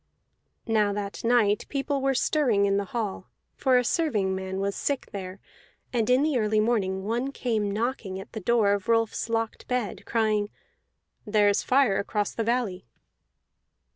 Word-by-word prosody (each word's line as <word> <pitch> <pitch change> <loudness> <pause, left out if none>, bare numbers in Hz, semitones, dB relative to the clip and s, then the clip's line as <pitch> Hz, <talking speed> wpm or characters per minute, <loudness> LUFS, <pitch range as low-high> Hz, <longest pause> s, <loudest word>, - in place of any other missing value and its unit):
Now 215 -3 +2
that 200 -1 -5
night 230 -3 +2
people 280 0 -1
were 270 0 +1
stirring 245 -8 +2
in 200 0 +2
the 200 - -1
hall, 210 -1 -4 0.3
for 260 -2 +3
a 250 - +3
servingman 190 - -1
was 200 0 -1
sick 280 -2 -2
there; 190 -1 -6 0.5
and 230 -2 +1
in 255 +3 +4
the 300 -5 +1
early 215 0 +2
morning 200 -4 0
one 240 +6 -1
came 220 -6 -1
knocking 210 -3 -2
at 195 - -10
the 220 - -4
door 220 0 +3
of 200 +1 -3
Rolfs 225 0 +1
locked 225 -1 -2
bed, 250 -4 -2
crying, 215 -2 +1 0.8
"There 210 -1 +4
is 200 - +2
fire 255 -7 +3
across 205 +1 -1
the 225 - -2
valley." 220 - -1
220 Hz, 160 wpm, -26 LUFS, 200-245 Hz, 0.8 s, in